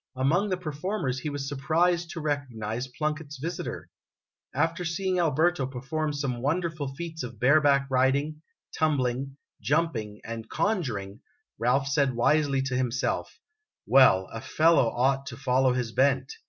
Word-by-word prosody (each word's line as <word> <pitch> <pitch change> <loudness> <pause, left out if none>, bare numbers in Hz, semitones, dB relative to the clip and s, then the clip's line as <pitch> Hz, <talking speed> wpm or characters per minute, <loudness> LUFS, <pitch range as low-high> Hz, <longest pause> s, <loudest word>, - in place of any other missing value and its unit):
Among 160 +11 +1
the 185 - 0
per 175 -4 -5
formers 145 -4 -2
he 150 - -3
was 145 -1 -4
surprised 165 +5 +1
to 170 - -6
recognize 125 -5 -3
Plunkett's 150 +2 -4
visitor! 165 +5 -5 0.6
After 165 +5 0
seeing 180 +2 -1
Alberto 160 -2 +2
perform 145 +4 -3
some 135 -4 -3
wonderful 155 +1 -1
feats 165 +1 -6
of 125 - -7
bareback 140 +1 +4
riding, 140 +4 +1 0.3
tumbling, 135 -3 0 0.2
jumping, 120 -10 -1
and 115 0 -7
conjuring, 120 - -2 0.4
Ralph 130 +4 +2
said 140 -2 +1
wisely 140 +2 +2
to 135 -1 -2
himself: 125 0 -1 0.5
"Well, 125 -9 +5
a 115 - -5
fellow 160 -3 +3
ought 135 +3 0
to - - -7
follow 130 -1 +2
his 125 -2 -2
bent. 135 +1 +2
140 Hz, 140 wpm, -27 LUFS, 130-160 Hz, 0.6 s, Well